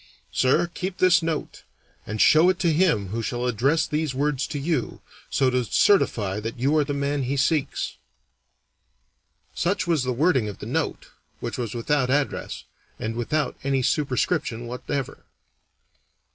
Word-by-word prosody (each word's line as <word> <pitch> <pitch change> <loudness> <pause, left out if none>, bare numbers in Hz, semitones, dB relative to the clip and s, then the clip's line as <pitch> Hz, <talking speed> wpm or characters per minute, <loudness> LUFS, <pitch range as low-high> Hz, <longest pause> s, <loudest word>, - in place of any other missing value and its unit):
Sir, 135 +7 +3
keep 185 +1 -4
this 185 -2 +5
note, 160 -2 -3 0.5
and 110 +1 -4
show 160 +9 +6
it 185 - +1
to 170 -4 +2
him 150 - +2
who 115 +4 -3
shall 120 +2 -2
address 125 +7 +2
these 150 -3 -2
words 140 0 0
to 150 - -4
you, 145 -2 -2 0.3
so 130 -1 +2
to 125 0 +1
certify 105 - +2
that 115 +3 -5
you 135 +5 +1
are 155 - +4
the 145 - -4
man 140 0 -1
he 135 +2 -1
seeks. 145 +1 0 1.6
Such 185 +3 0
was 165 -5 +1
the 130 0 -1
wording 130 -3 +2
of 100 - -8
the - - -8
note, - - -2 0.3
which - - -5
was 120 -2 -3
without 130 +2 0
address, 145 +1 -1 0.3
and 110 - -3
without 150 +6 -1
any 135 -1 +1
superscription 130 -3 0
whatever. 125 +3 -4
140 Hz, 155 wpm, -24 LUFS, 120-155 Hz, 1.6 s, show